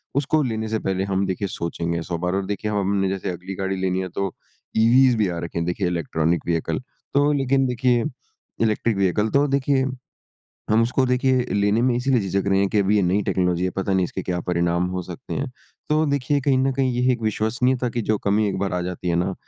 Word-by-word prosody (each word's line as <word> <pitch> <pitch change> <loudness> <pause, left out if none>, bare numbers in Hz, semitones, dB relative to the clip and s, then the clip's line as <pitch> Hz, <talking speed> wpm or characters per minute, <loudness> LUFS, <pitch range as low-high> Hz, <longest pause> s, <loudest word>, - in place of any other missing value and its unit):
उसको 150 +2 +2
लेने 110 -3 -2
से 110 0 0
पहले 95 0 -1
हम 100 0 0
देखिए 95 +2 -2
सोचेंगे 85 -1 -3
100 85 0 -3
बार। 90 +2 -1
और 95 0 -1
देखिए 105 +2 -3
हमने 100 -1 +1
जैसे 95 0 -3
अगली 90 +2 -7
गाड़ी 95 0 -2
लेनी 95 0 0
है 95 - -4
तो 100 -2 -2 0.4
ईवीज़ 120 +3 +5
भी 105 - +2
आ 85 -1 -3
रखी 85 0 -5
हैं 85 - -1
देखिए 90 +1 -1
इलेक्ट्रॉनिक 85 -1 0
व्हीकल। 80 -1 0 0.3
तो 145 +1 +4
लेकिन 135 -1 +2
देखिए 125 -1 +2 0.6
इलेक्ट्रिक 110 -1 +1
व्हीकल 100 +3 +1
तो 140 +1 +3
देखिए 135 -1 +1 0.9
हम 110 +1 +5
उसको 125 +3 +1
देखिए 125 0 +2
लेने 105 +2 +2
में 125 -1 +3
इसीलिए 125 -1 +2
झिझक 100 0 -1
रहे 95 - +3
हैं 100 - +2
कि 105 - +1
अभी 100 +2 +2
ये 100 - +3
नई 95 +3 +2
टेक्नोलॉजी 90 -2 0
है, 95 - 0
पता 95 +1 -2
नहीं 95 -1 +3
इसके 95 - -4
क्या 90 -1 -2
परिणाम 85 0 0
हो 90 0 -3
सकते 90 +9 -7
हैं। 140 -1 -3 0.4
तो 155 +1 +3
देखिए 140 0 +1
कहीं 135 -1 +2
न 135 +1 +2
कहीं 130 -1 0
ये 125 +1 +2
एक 120 - -4
विश्वसनीयता 120 +4 0
की 120 - +1
जो 110 0 +1
कमी 105 +1 +1
एक 95 - -2
बार 100 0 -1
आ 90 - 0
जाती 90 0 -4
है - - +1
ना 90 +2 0
100 Hz, 225 wpm, -23 LUFS, 90-125 Hz, 0.9 s, ईवीज़